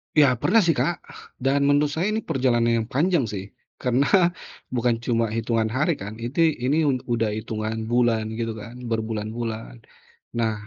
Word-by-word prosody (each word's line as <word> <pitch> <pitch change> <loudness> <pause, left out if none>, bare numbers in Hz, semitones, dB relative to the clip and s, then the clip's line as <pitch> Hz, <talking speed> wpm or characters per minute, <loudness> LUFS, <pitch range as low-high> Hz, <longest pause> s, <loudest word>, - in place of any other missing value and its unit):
Ya 150 -2 +7
pernah 225 -1 +4
sih, 170 - +4
Kak, 175 - +1 0.5
dan 140 +1 +3
menurut 145 +1 +3
saya 165 +6 0
ini 215 0 -1
perjalanan 120 -3 +1
yang 110 - -3
panjang 160 0 +2
sih, 100 -1 -6 0.3
karena 125 +3 +2 0.7
bukan 120 -1 +2
cuma 115 -2 +2
hitungan 115 -1 0
hari, 130 +9 +1
kan? 100 +2 -6
Iti 125 +8 -1 0.2
ini, 140 +4 +2
un 130 -3 0
udah 115 -2 0
hitungan 110 0 -3
bulan 120 -2 +3 0.2
gitu 115 -1 -1
kan, 115 +4 -10
berbulan-bulan. 110 - -3 0.6
Nah 110 -1 +1
120 Hz, 155 wpm, -24 LUFS, 110-140 Hz, 0.7 s, Ya